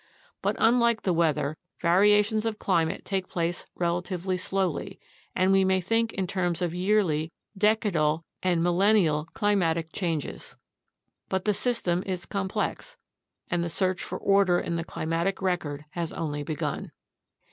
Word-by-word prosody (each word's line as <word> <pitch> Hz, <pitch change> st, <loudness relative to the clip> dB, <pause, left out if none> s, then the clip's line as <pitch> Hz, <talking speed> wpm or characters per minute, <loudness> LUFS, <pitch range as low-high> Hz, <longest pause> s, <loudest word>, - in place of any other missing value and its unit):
But -, -, 0 dB
unlike 235 Hz, -1 st, +3 dB
the 185 Hz, -, +2 dB
weather, 155 Hz, -3 st, +1 dB, 0.2 s
variations 210 Hz, +5 st, +4 dB
of 220 Hz, -1 st, -2 dB
climate 165 Hz, -6 st, 0 dB
take 190 Hz, -2 st, -2 dB
place 170 Hz, 0 st, -2 dB
relatively 175 Hz, +1 st, -1 dB
slowly, 190 Hz, 0 st, -2 dB, 0.4 s
and 185 Hz, +1 st, +3 dB
we 195 Hz, 0 st, +5 dB
may 190 Hz, 0 st, +3 dB
think 225 Hz, +5 st, +1 dB
in 190 Hz, -, -1 dB
terms 175 Hz, -3 st, -1 dB
of 175 Hz, -2 st, -1 dB
yearly, 180 Hz, -4 st, +1 dB, 0.2 s
decadal, 190 Hz, -7 st, +2 dB, 0.2 s
and 175 Hz, -3 st, +1 dB
millenial 175 Hz, -4 st, +3 dB
climatic 170 Hz, -6 st, +1 dB
changes. 160 Hz, -, -3 dB, 0.7 s
But 190 Hz, -1 st, -1 dB
the 210 Hz, -, +3 dB
system 200 Hz, -6 st, 0 dB
is 185 Hz, -2 st, -3 dB
complex, 200 Hz, -, -3 dB, 0.5 s
and 175 Hz, 0 st, +1 dB
the 170 Hz, -, -2 dB
search 185 Hz, +2 st, 0 dB
for 185 Hz, -, -4 dB
order 195 Hz, -3 st, +3 dB
in 170 Hz, -, -3 dB
the 165 Hz, -, -2 dB
climatic 165 Hz, +4 st, -2 dB
record 160 Hz, -6 st, -2 dB
has 170 Hz, -1 st, -3 dB
only 150 Hz, -2 st, -3 dB
begun. 150 Hz, 0 st, -3 dB
180 Hz, 140 wpm, -27 LUFS, 165-200 Hz, 0.7 s, we